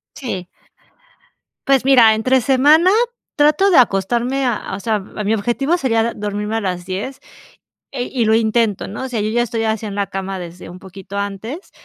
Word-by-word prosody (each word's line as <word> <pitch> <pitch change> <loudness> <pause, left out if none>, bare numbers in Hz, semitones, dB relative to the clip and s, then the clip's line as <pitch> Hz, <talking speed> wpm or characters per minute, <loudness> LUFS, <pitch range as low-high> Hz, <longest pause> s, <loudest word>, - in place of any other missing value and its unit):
Sí. 190 -10 -5 1.2
Pues, 270 -2 +3
mira, 235 -5 +6
entre 255 +3 +2
semana 290 +8 +4 0.5
trato 300 +7 +3
de 350 - +4
acostarme 240 +5 +2
a 225 -5 -2
o - - -7
sea, 220 -1 -1
mi 210 +2 -3
objetivo 270 - 0
sería 230 -6 +1
d 235 - -2
dormirme 210 +1 -3
a - - -2
las 180 -2 -3
10, 205 +9 -5 0.7
eh, 245 -3 -3
y 240 -4 0
lo 220 +1 +3
intento, 225 -2 +1
¿no?, 210 +6 -6
o - - -4
sea, 235 -4 -3
yo 210 - -1
ya 240 +2 +1
estoy 230 -1 -2
así 220 0 -1
en 205 -2 -5
la 200 -1 -1
cama 195 0 -5
desde 175 0 -9
un 180 - -11
poquito 195 +1 -9
antes, 205 - -5
225 Hz, 185 wpm, -18 LUFS, 200-260 Hz, 1.2 s, mira